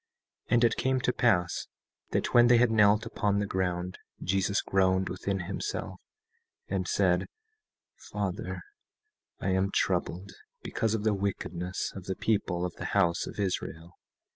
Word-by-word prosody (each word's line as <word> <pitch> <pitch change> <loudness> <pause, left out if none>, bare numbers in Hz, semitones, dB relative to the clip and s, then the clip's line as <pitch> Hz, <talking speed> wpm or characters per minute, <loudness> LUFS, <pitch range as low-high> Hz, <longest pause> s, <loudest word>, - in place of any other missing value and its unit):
17:14 - - -1
And 120 - +4
it 115 -1 +4
came 130 +1 +1
to 125 0 0
pass 90 -9 +1 0.4
that - - -1
when 120 0 +7
they 120 0 +6
had 120 -1 +4
knelt 105 0 +4
upon 105 -3 0
the 105 - +1
ground, 90 -2 -2 0.2
Jesus 95 +2 +1
groaned 95 0 +2
within 95 +1 -2
himself, 100 - -4 0.7
and - - -2
said: - - +2 0.8
Father, - - -3 0.8
I - - -1
am 95 +1 +2
troubled 95 0 -1 0.3
because 110 -1 0
of 105 - -3
the 110 -1 +3
wickedness 95 -2 -3
of 95 -2 -8
the 95 - -2
people 90 -5 0
of 90 - -4
the - - -5
house 85 -4 +2
of - - -8
Israel. 85 -3 -3
100 Hz, 150 wpm, -29 LUFS, 90-110 Hz, 0.8 s, when